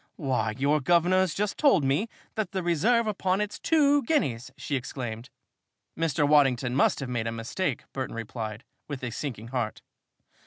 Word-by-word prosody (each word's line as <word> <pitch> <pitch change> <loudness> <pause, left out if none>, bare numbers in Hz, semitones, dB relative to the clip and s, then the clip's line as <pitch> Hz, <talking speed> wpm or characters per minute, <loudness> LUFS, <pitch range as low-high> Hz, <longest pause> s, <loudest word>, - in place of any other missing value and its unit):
"Why, 130 -7 -1
your 145 +3 +2
guvnor's 175 +3 +3
just 205 0 -2
told 275 - +5
me 140 +12 +1 0.2
that 215 -5 -3
the 190 -1 -1
reserve 215 +8 +3
upon 190 -3 0
it's 210 0 -3
two 290 -3 +4
guineas!" 135 - 0
she 145 - -3
exclaimed. 120 -2 -5 0.7
"Mr. 150 -3 +1
Waddington 135 -4 +3
must 140 - +3
have 135 - -4
made 120 -2 -1
a - - -1
mistake," 120 +6 -2
Burton 130 -3 -4
replied, 110 0 -5 0.2
with 140 -3 -6
a 125 - -3
sinking 115 -3 -5
heart. 120 -4 -3
145 Hz, 160 wpm, -27 LUFS, 125-190 Hz, 0.7 s, told